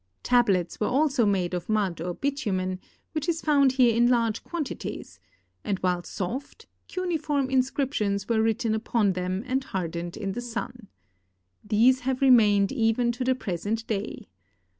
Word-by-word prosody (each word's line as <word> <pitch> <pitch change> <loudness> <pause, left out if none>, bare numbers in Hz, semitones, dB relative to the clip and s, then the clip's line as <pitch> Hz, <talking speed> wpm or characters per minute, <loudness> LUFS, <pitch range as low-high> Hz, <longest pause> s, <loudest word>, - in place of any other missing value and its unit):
Tal)lets 200 -8 +2
were 210 - +1
also 270 -4 +2
made 185 -3 0
of 175 +2 -4
mud 200 -6 0
or 175 +1 -3
bitumen, 190 -10 -2 0.3
which 310 +1 -2
is 330 -1 0
found 280 -4 +3
here 245 -4 +4
in 240 +1 +4
large 230 -3 +1
quantities, 325 -5 -6 0.4
and 200 -2 -1
while 180 -1 +1
soft, 240 +12 -5 0.2
cuneiform 310 -7 -1
inscriptions 255 -6 0
were 225 -2 +2
written 225 +1 +1
upon 220 -2 +1
them 185 +2 -2
and 260 +1 -1
hardened 175 -4 -4
in 195 - -3
the 240 - -4
sun. 240 -1 -6 0.8
These 230 +5 +4
have 255 0 -2
remained 210 -7 +5
even 235 -1 +1
to 245 +2 -4
the 260 +1 +2
present 215 +1 -3
day. 210 -1 -4
230 Hz, 150 wpm, -26 LUFS, 195-260 Hz, 0.8 s, remained